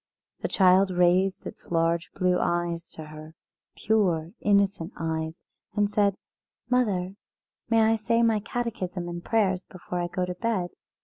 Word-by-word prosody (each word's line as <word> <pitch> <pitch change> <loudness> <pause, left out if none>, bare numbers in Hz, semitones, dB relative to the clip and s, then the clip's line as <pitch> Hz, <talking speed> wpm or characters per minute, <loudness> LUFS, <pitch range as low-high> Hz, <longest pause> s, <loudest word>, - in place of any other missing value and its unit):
The - - -2
child 190 0 +4
raised 180 +1 +2
its - - -9
large 165 0 +1
blue 180 -1 +2
eyes 175 -1 -1
to 160 - -8
her, 155 +1 -11 0.4
pure 180 -7 +1
innocent 200 -3 +1
eyes, 160 0 -3 0.3
and 205 0 +1
said: 200 -2 +2 0.6
"Mother, 195 -7 +1 0.6
may 225 -1 +4
I 220 +1 +4
say 230 +2 +1
my 225 -2 +3
Catechism 200 -6 -4
and 175 0 -6
prayers 190 -5 +1
before 180 -1 -6
I 175 - -1
go 180 +1 -2
to 180 - -4
bed?" 185 -2 -1
185 Hz, 145 wpm, -26 LUFS, 175-210 Hz, 0.6 s, child